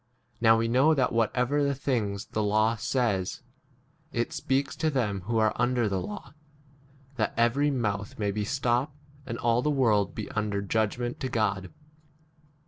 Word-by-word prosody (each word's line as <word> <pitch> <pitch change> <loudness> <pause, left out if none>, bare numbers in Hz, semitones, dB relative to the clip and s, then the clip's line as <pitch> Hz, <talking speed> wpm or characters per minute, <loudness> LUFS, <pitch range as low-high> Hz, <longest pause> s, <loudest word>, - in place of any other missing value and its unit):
Now 115 -1 +6
we 115 0 +1
know 135 +7 +4
that 130 -3 +1
whatever 125 +5 +1
the 140 -1 +1
things 110 -7 -2
the 110 - -3
law 110 +2 +2
says, 115 -4 -1 0.7
it 120 0 -2
speaks 135 +2 -1
to 160 - +1
them 110 -9 -1
who 115 +2 -1
[are] 110 -1 +3
under 125 0 +1
k 110 - +1
the 95 -1 -1
law, 205 -7 -7 0.8
that 110 -2 -1
every 120 +5 +3
mouth 105 -6 -2
may 105 -2 0
be 105 +1 -2
stopped, 130 +4 0 0.3
and 115 - -4
all 120 +1 +2
the 150 - 0
world 115 -8 +2
be 110 - -4
1 - - -11
under 105 -2 0
judgment 110 +4 -1
to 130 - -3
God. 105 -5 -1
115 Hz, 170 wpm, -28 LUFS, 105-130 Hz, 0.8 s, Now